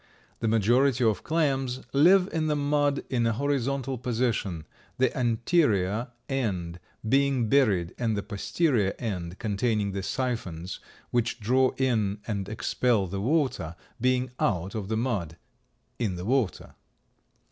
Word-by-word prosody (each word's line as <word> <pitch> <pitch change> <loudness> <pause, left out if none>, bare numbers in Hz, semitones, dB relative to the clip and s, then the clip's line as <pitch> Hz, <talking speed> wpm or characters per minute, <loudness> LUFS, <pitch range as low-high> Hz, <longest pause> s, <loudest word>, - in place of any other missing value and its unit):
The 115 - -1
majority 120 +4 +3
of 110 -5 +2
clams 135 -5 0
live 180 +7 +6
in 160 -1 0
the 150 - +1
mud 145 -1 +1
in 120 -3 +2
a 115 - +2
horizontal 135 0 -1
position, 115 -9 -1 0.3
the 130 -1 +2
anterior 115 - +1 0.2
end 95 -10 -2 0.3
being 135 -1 +2
buried 100 -11 +3
and 115 -3 0
the 100 - -2
posterior 110 - 0
end, 90 -6 -4
containing 105 -1 0
the 95 0 -3
siphons 95 -8 -3 0.3
which 120 0 0
draw 130 +4 +2
in 110 -6 +1
and 100 -3 -3
expel 110 -1 +1
the 95 +2 -4
water, 130 - 0 0.3
being 130 0 +1
out 95 -2 0
of 105 -3 -4
the 110 +1 -1
mud, 100 -10 -2 0.6
in 105 -7 -1
the 90 +1 -6
water. 125 -4 0
115 Hz, 135 wpm, -27 LUFS, 100-135 Hz, 0.6 s, live